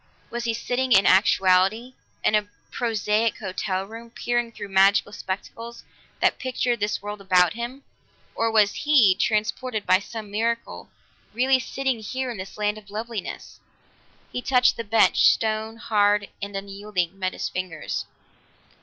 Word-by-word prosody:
Was 240 0 -4
he 230 - 0
sitting, 250 +2 0
in 195 -2 +6
actuality, 195 +5 +3 0.3
in - - +2
a 210 -1 +2 0.2
prosaic 220 -1 0
hotel 190 -1 -3
room, 230 +3 -10
peering 240 0 -2
through 205 -3 -8
magic 195 +1 +4
spectacles 230 +5 -6 0.4
that - - +2
pictured 250 -2 -1
this 210 0 -2
world 205 0 -6
about 180 -3 +3
him, 240 +4 -6 0.5
or 230 0 0
was 210 -2 +4
he, 270 -10 +4
transported 215 +3 -1
by 185 - +4
some 210 0 -8
miracle, 230 +2 -2 0.5
really 260 +2 +3
sitting 265 -1 -2
here 255 +4 -4
in 230 - -7
this 190 +2 -8
land 210 0 -1
of 205 -1 -19
loveliness? 220 0 -6 0.7
He 250 - -3
touched 250 -1 +3
the 230 - -4
bench; 225 +1 +3
stone, 220 0 +1
hard 205 -2 +2
and 200 0 -5
unyielding, 195 -2 -3
met 185 -1 -1
his - - -3
fingers. 180 -4 -4
215 Hz, 145 wpm, -24 LUFS, 200-235 Hz, 0.7 s, in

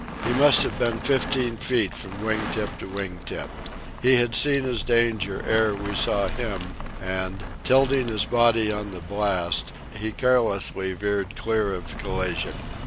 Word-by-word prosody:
He 120 - +1
must 140 +2 +6
have - - -4
been 115 -1 +1
fifteen 130 -2 0
feet 115 -6 +1
from 100 +2 -6
wing 110 0 +1
tip 105 -2 -3
to - - -7
wing 95 -2 -5
tip. - - -5 0.5
He 130 +1 +6
had 120 -1 +2
seen 140 +4 +3
his 125 -4 -1
danger 115 -4 +1
ere 110 -2 +3
we 100 0 -5
saw 100 +1 +1
him, 110 -1 -4 0.4
and, 95 +1 -4 0.2
tilting 135 -1 +3
his 110 -3 +1
body 115 -2 +3
on 105 -1 -4
the 90 -2 -8
blast, 90 -3 0 0.2
he 110 0 -3
carelessly 105 -6 +1
veered 100 +1 -2
clear 110 -3 0
of 85 -2 -8
collision. 95 -4 -2
105 Hz, 160 wpm, -24 LUFS, 95-120 Hz, 0.5 s, must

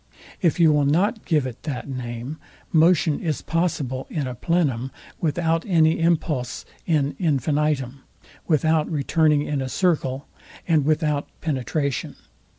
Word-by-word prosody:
If 170 -1 +2
you 165 -2 +6
will 145 -1 +2
not 200 - +1
give 150 -5 +2
it 125 -2 -7
that 140 -5 -5
name, 125 +2 -5 0.3
motion 160 -2 +4
is 155 -4 -2
possible 150 -6 -1
in 150 -4 -2
a 130 - -4
plenum, 135 -3 0 0.3
without 165 +1 0
any 160 -4 +3
impulse 155 -6 0 0.2
in 145 -4 +1
infinitum, 145 -4 0 0.5
without 155 -1 +2
returning 150 0 +2
in 145 -2 -2
a 130 - -3
circle, 145 -6 0 0.4
and 155 -5 +3
without 150 -1 +1
penetration. 140 -2 -2
150 Hz, 130 wpm, -23 LUFS, 135-165 Hz, 0.5 s, you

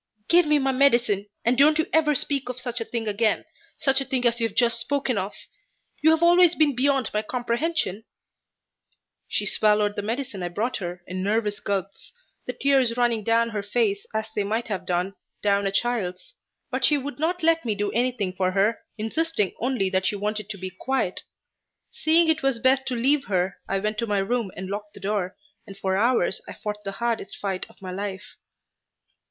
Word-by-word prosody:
"Give 345 -1 +5
me 300 0 +4
my 270 -1 +1
medicine, 240 -7 +3 0.2
and 240 +2 +3
don't 305 +2 +6
ever 300 -2 +3
speak 275 -1 0
of 250 0 -4
such 245 -1 -4
a - - -2
thing 230 -1 -4
again 215 +1 +1 0.3
such 275 -2 +3
a - - 0
thing 260 -2 -1
as 235 0 +2
you 230 - +2
have 210 - -14
just 235 -1 +3
spoken 280 -2 0
of! 195 0 -3 0.7
You 315 - +5
have 320 +1 +3
always 350 0 +6
been 295 -4 +3
beyond 270 -2 +1
my 210 - +1
comprehension." 240 - -1 1.2
She 205 - -1
swallowed 210 0 +2
the - - -2
medicine 230 -1 -4
I 175 - -1
brought 225 +8 -2
her 175 -2 -6
in 185 0 -5
nervous 210 +1 0
gulps, 195 -1 -4 0.3
the 250 - -2
tears 260 -2 +2
running 235 -3 +1
down 230 +1 +2
her 210 -2 -3
face 205 -1 0
as 220 0 -2
they 205 - +1
might 220 +4 -2
have 200 -3 -4
done 180 +2 0 0.3
down 200 -1 +2
a - - -1
child's, 220 - -1 0.4
but 260 +1 -2
she 295 - +5
would 285 +1 -6
not 345 +3 -1
let 330 0 +3
me 220 -3 -1
do 205 0 -1
anything 235 -5 0
for 185 0 0
her, 205 +3 +2 0.2
insisting 225 - -1
only 245 -5 0
that 185 0 +1
she 205 - 0
wanted 210 0 -3
to 210 - -5
be 185 0 -6
quiet. 190 0 -2 0.7
Seeing 325 +1 +3
it 320 0 +2
was 270 -3 +1
best 260 +2 +2
to 255 - -1
leave 270 +4 +2
her, 185 -1 0
I 195 - +1
went 210 +2 -2
to 230 - -1
my 205 -1 +1
room 215 +2 0
and 190 - -5
locked 205 +1 -6
the - - -10
door, 195 -1 -2 0.3
and 195 - -10
for 190 -1 -1
hours 230 -2 +2
I - - -7
fought 210 0 -6
the 195 -1 -4
hardest 235 -1 -2
fight 190 -2 -3
of - - -21
my 185 - -5
life. 195 +1 -6
225 Hz, 200 wpm, -25 LUFS, 200-265 Hz, 1.2 s, don't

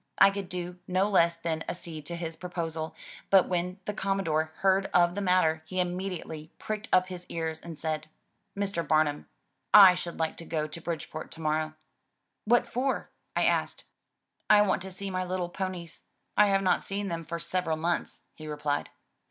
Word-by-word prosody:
I 195 - +7
could 195 -2 -5
do 180 0 -5
no 185 +2 +2
less 170 -4 +4
than 165 -1 -3
accede 160 -4 -5
to 170 - -4
his 165 -1 -4
proposal, 165 -3 -4 0.3
but 195 -2 +6
when 180 +1 -1
the 210 - -2
Commodore 170 -6 0
heard 195 0 +3
of 175 -1 +5
the 205 - -3
matter, 180 -4 +3
he 185 +2 -3
immediately 180 -4 -3
pricked 215 0 -4
up 185 0 +4
his 180 -1 -6
ears, 160 -1 -3
and 165 -2 -8
said, 155 0 -3 0.5
"Mr. 200 -4 -1
Bar 155 0 +5
num, 145 -1 -5 0.4
/ 190 -3 +9
should 170 -1 -5
like 160 -1 -1
to - - -6
go 155 -2 -1
to 160 +2 -8
Bridgeport 160 -1 -5
to 165 - -10
morrow." 155 0 0 0.7
"What 240 +3 +4
for?" 260 +2 -1 0.2
I - - +3
asked. - - +1 0.7
"I 210 0 +8
want 195 -2 +1
to 190 - -6
see 195 +1 -5
my 185 0 -1
little 180 -1 -2
ponies. 180 -3 -5 0.3
I 210 - +6
have 195 -1 +2
not 185 - +3
seen 200 +1 -3
them 165 -2 -3
for 170 +1 -4
several 170 -1 -1
months," 170 +2 -2
he 155 - -10
replied. 150 -1 -2
175 Hz, 185 wpm, -29 LUFS, 160-190 Hz, 0.7 s, /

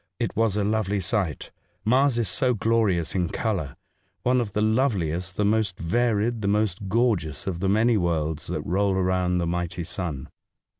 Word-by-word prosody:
It - - -2
was 110 -2 +1
a 105 - +1
lovely 105 -1 0
sight! 95 -4 -2 0.3
Mars 130 +2 +3
is 115 -3 +1
so 125 +7 +1
glorious 100 -7 +1
in 90 -3 0
colour 95 - -2 0.2
— - - -45
one 125 0 +3
of 105 -4 -4
the 105 - 0
lovehest, 95 - 0
the 105 - +1
most 105 -3 +1
varied, 115 +4 0
the 100 - -1
most 100 -2 0
gorgeous 100 - 0
of 90 -3 -3
the 95 +1 0
many 110 +3 +3
worlds 80 -4 -1
that - - -4
roll 100 +2 +1
around 90 -1 +1
the 85 - 0
mighty 85 0 -2
sun. 80 -6 -5
100 Hz, 180 wpm, -25 LUFS, 85-110 Hz, 0.3 s, Mars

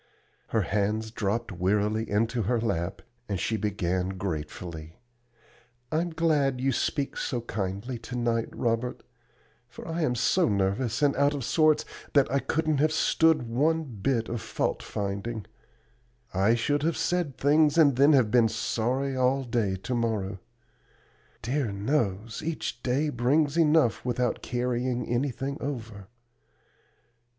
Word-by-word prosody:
Her - - +1
hands 110 +2 -1
dropped 115 +1 -2
wearily 105 +4 0
into 115 +3 +1
her 115 +4 +1
lap, 95 -7 -2 0.3
and 100 -3 -1
she 110 - 0
began 95 -3 -1
gratefully: 80 -2 -5 0.9
"I'm 165 +3 0
glad 150 -5 +1
you 135 +1 +1
speak 140 +3 -1
so 120 -3 -2
kindly 105 +3 -4
to 120 +2 -8
night, 120 -1 0
Robert, 115 +1 -2 0.6
for - - -11
I 165 +1 -2
am 125 -6 +1
so 125 +8 +2
nervous 105 +6 0
and 145 -1 +3
out 145 +1 +3
of 140 - -4
sorts 155 +4 +3 0.3
that 140 -3 +4
I 140 - +2
couldn't 155 0 0
have 155 +2 +3
stood 160 -1 +3
one 150 +8 +1
bit 115 -2 -1
of 115 -1 -4
fault - - -2
finding 100 +2 -4 0.9
I 100 +5 +3
should 145 +5 0
have 165 +2 0
said 175 -6 -1
things, 150 +2 +3
and 145 -5 +6
then 140 +4 +5
have 125 -6 +4
been 120 -2 +5
sorry 125 +4 -1
all 130 +1 +2
day 115 -6 0
to 95 +7 -5
morrow. 105 -5 -1 1.0
Dear 125 0 -1
knows, 105 -1 -1
each 155 -6 -3
day 135 +5 0
brings 145 +4 +1
enough 155 -7 +3
without 125 0 -1
carrying 125 0 -1
anything 135 +2 -2
over. 115 -8 -5
120 Hz, 140 wpm, -27 LUFS, 105-140 Hz, 1.0 s, and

